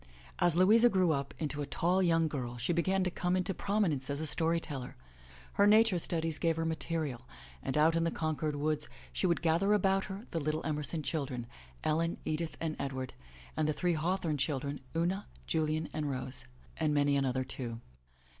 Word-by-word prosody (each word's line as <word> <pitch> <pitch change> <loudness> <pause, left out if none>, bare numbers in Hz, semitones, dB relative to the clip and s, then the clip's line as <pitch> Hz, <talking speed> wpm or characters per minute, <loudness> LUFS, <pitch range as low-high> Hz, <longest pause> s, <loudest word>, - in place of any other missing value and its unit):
As 175 -2 +4
Louisa 220 +7 +6
grew 185 -5 +3
up 140 -2 -1
into 150 -2 -3
a 145 - -3
tall 180 +6 +1
young 165 -2 +3
girl 125 -5 -4
she 125 +9 0
began 190 +3 +2
to 180 - 0
come 180 +1 0
into 185 +1 0
prominence 185 -11 0
as 140 0 -1
a 160 - -2
story 165 +2 +1
teller. 140 -6 -6 0.6
Her 200 0 +4
nature 215 -3 +5
studies 165 -2 -1
gave 165 -1 +2
her 165 0 -1
material, 160 -6 -2 0.3
and 135 - -2
out 160 +2 +5
in 165 - +2
the 165 - +2
Concord 155 -2 -1
woods 150 +1 -1 0.2
she 185 - +1
would 170 -2 +1
gather 170 +6 +3
about 195 -1 +2
her 200 +3 -7
the 165 - -1
little 155 +1 -2
Emerson 150 +1 -1
children, 135 -6 -2 0.4
Ellen, 165 +2 +1
Edith 155 +1 -2
and 160 -2 -2
Edward, 130 -2 -3 0.4
and 155 -1 +1
the - - +2
three 175 +3 +1
Haw 165 +4 +1
thorne 160 -6 -2
children, 140 0 -1 0.2
Una, 175 +4 0 0.2
Julian 155 - 0
and 150 -1 -2
Rose, 130 - -3 0.3
and 150 -1 +1
many 145 0 +3
another, 130 -2 +1
too. 120 -3 -5
160 Hz, 190 wpm, -32 LUFS, 145-175 Hz, 0.6 s, Louisa